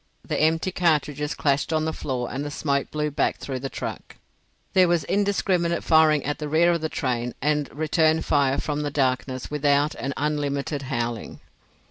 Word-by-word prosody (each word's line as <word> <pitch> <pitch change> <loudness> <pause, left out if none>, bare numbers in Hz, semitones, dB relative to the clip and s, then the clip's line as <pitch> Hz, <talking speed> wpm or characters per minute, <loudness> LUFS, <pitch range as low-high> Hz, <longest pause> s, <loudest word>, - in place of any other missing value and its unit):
The - - -1
empty 160 +4 +2
cartridges 150 -4 0
clashed 140 +2 0
on 155 -1 +1
the 160 - -1
floor 125 -3 -3
and 135 +3 -3
the 145 - -4
smoke 140 -1 -1
blew 150 0 -2
back - - 0
through 130 -2 -5
the 135 +1 -4
truck. - - -6 0.6
There 185 -1 +5
was 170 -2 +2
indiscriminate 185 -3 0
firing 155 -2 +4
at 145 +1 -2
the 150 -1 -4
rear 170 +3 +4
of 170 -2 0
the 160 - -2
train, 125 -5 -2
and 150 0 0
return 155 +1 +2
fire 140 -2 +2
from 150 -1 -2
the 145 - -1
darkness 130 -2 -1
without 145 0 +2
and 135 - -4
unlimited 145 -1 -1
howling. 115 -1 -3
150 Hz, 175 wpm, -24 LUFS, 140-160 Hz, 0.6 s, There